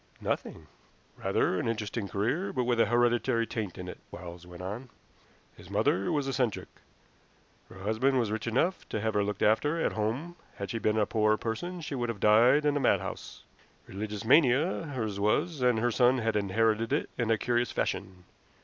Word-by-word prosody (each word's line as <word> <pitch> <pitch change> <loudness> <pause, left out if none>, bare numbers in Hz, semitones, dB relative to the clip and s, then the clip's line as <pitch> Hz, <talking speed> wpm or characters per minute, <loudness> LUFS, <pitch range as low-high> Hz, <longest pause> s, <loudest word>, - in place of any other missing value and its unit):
"Nothing." 80 - -3 0.5
"Rather 95 - 0
an - - -2
interesting 110 -1 -3
career, 115 - -1
but 125 - -1
with 120 -1 +1
an - - +4
hereditary 120 -1 +2
taint 105 -6 -4
in 90 -1 -7
it," 90 - -8
Quarles 85 0 -10
went 90 0 -10
on. 110 +7 -6 0.7
"His - - -14
mother 95 +2 +1
was 145 -3 0
eccentric. 130 -5 -1 1.0
Her - - -13
husband 120 +6 +1
was 115 -4 0
rich 110 +1 -3
enough 150 +11 0
to 110 - -2
have 110 +1 -1
her 105 - +2
looked 105 -1 -2
after 145 +10 +2
at - - +1
home; 125 +12 -3 0.2
had 100 - -5
she 115 - -2
been 110 0 +1
a 105 - +3
poorer 110 0 +2
person 175 +13 -4
she 150 - -5
would 120 -3 -2
have 110 -3 -4
died 120 +8 +5
in 145 -1 +2
a - - +1
madhouse. - - -1 0.4
Religious 105 +1 -6
mania 145 +6 +4
hers 110 -8 -3
was, 145 +9 +1
and 125 -2 +3
her 120 +2 +1
son 125 +2 +4
has 115 -2 -1
inherited 110 +3 +1
it - - 0
in 120 -2 0
a 115 - +3
curious 120 +2 0
fashion. 90 -1 -3
115 Hz, 185 wpm, -29 LUFS, 105-125 Hz, 1.0 s, died